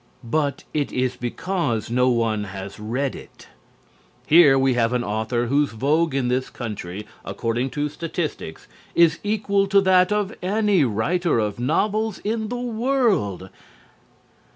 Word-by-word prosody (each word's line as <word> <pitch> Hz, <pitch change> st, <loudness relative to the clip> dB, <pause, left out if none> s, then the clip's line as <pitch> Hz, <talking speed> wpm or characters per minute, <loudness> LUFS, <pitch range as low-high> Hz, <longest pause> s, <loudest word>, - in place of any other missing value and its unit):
But 140 Hz, +4 st, -1 dB
it 150 Hz, -2 st, -1 dB
is 130 Hz, 0 st, -1 dB
because 120 Hz, -, -2 dB
no 125 Hz, +1 st, +3 dB
one 115 Hz, -3 st, 0 dB
has 95 Hz, +1 st, -8 dB
read 125 Hz, +6 st, -2 dB
it. -, -, -13 dB, 0.8 s
Here 150 Hz, -4 st, +6 dB
we 135 Hz, -1 st, +3 dB
have 120 Hz, 0 st, +1 dB
an 125 Hz, -1 st, 0 dB
author 110 Hz, +3 st, -1 dB
whose 140 Hz, +4 st, +2 dB
vogue 150 Hz, +6 st, +1 dB
in 130 Hz, -3 st, 0 dB
this 130 Hz, +1 st, -1 dB
country, 105 Hz, -4 st, -6 dB, 0.2 s
according 120 Hz, +3 st, -2 dB
to 145 Hz, 0 st, +1 dB
statistics, 150 Hz, -, -5 dB, 0.3 s
is 165 Hz, -1 st, +4 dB
equal 200 Hz, -1 st, +1 dB
to 200 Hz, 0 st, +4 dB
that 185 Hz, -1 st, +4 dB
of 210 Hz, 0 st, 0 dB
any 200 Hz, -2 st, +2 dB
writer 145 Hz, -, 0 dB
of 105 Hz, -1 st, -1 dB
novels 210 Hz, -, 0 dB
in 220 Hz, +1 st, -2 dB
the 245 Hz, +3 st, -4 dB
world. 225 Hz, -, 0 dB
140 Hz, 140 wpm, -23 LUFS, 115-190 Hz, 0.8 s, Here